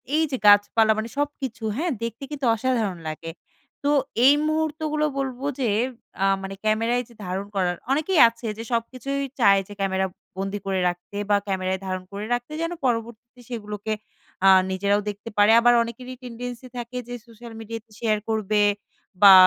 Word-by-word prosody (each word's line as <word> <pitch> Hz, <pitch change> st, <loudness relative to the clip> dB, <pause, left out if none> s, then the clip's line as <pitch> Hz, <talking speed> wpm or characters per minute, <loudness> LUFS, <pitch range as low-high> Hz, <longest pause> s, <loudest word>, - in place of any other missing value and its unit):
এই 320 Hz, -, +4 dB
যে 260 Hz, -, 0 dB
গাছপালা, 205 Hz, +2 st, +6 dB
মানে 220 Hz, +1 st, -3 dB
সবকিছু। 270 Hz, -5 st, -3 dB
হ্যাঁ? 340 Hz, +4 st, 0 dB
দেখতে 230 Hz, +3 st, -5 dB
কিন্তু 280 Hz, -3 st, -3 dB
অসাধারণ 225 Hz, -5 st, 0 dB
লাগে। 165 Hz, +1 st, -5 dB, 0.5 s
তো 285 Hz, -, +2 dB, 0.4 s
এই 275 Hz, -, +9 dB
মুহূর্তগুলো 310 Hz, -1 st, 0 dB
বলব 265 Hz, -2 st, -2 dB, 0.2 s
যে, 250 Hz, -4 st, +1 dB, 0.5 s
আ -, -, +4 dB, 0.2 s
মানে 195 Hz, 0 st, -5 dB
ক্যামেরায় 230 Hz, +3 st, +1 dB
যে 235 Hz, -, -16 dB
ধারণ 185 Hz, +2 st, -3 dB
করার, 180 Hz, -2 st, +1 dB, 0.2 s
অনেকেই 310 Hz, +5 st, +2 dB
আছে 230 Hz, +1 st, -12 dB
যে, 225 Hz, -, -5 dB
সবকিছুই 255 Hz, +4 st, -2 dB, 0.2 s
চায় 195 Hz, -3 st, +6 dB
যে 205 Hz, -, -9 dB
ক্যামেরা 190 Hz, -1 st, +1 dB, 0.3 s
বন্দি 195 Hz, +1 st, -3 dB
করে 190 Hz, -1 st, 0 dB
রাখতে 175 Hz, +3 st, -8 dB
বা 205 Hz, -, +5 dB
ক্যামেরায় 190 Hz, -1 st, -1 dB
ধারণ 185 Hz, -1 st, -3 dB
করে 205 Hz, +1 st, -4 dB
রাখতে। 245 Hz, +3 st, -3 dB
যেন 330 Hz, +1 st, -1 dB
পরবর্তীতে 235 Hz, +1 st, -3 dB
সেগুলোকে 210 Hz, -2 st, -4 dB, 0.5 s
আ -, -, +9 dB, 0.2 s
নিজেরাও 200 Hz, +2 st, +1 dB
দেখতে 205 Hz, +2 st, -7 dB
পারে। 205 Hz, +1 st, +6 dB
আবার 240 Hz, +1 st, +5 dB
অনেকেরই 250 Hz, +2 st, -8 dB
টেনডেন্সি 245 Hz, +1 st, -7 dB
থাকে 240 Hz, +1 st, -5 dB
যে, 245 Hz, -, -6 dB
সোশ্যাল 230 Hz, 0 st, -12 dB
মিডিয়াতে 225 Hz, 0 st, -8 dB
শেয়ার 215 Hz, -2 st, +1 dB
করবে 215 Hz, -1 st, +1 dB, 0.6 s
বা 200 Hz, -1 st, +11 dB
230 Hz, 165 wpm, -24 LUFS, 205-250 Hz, 0.6 s, বা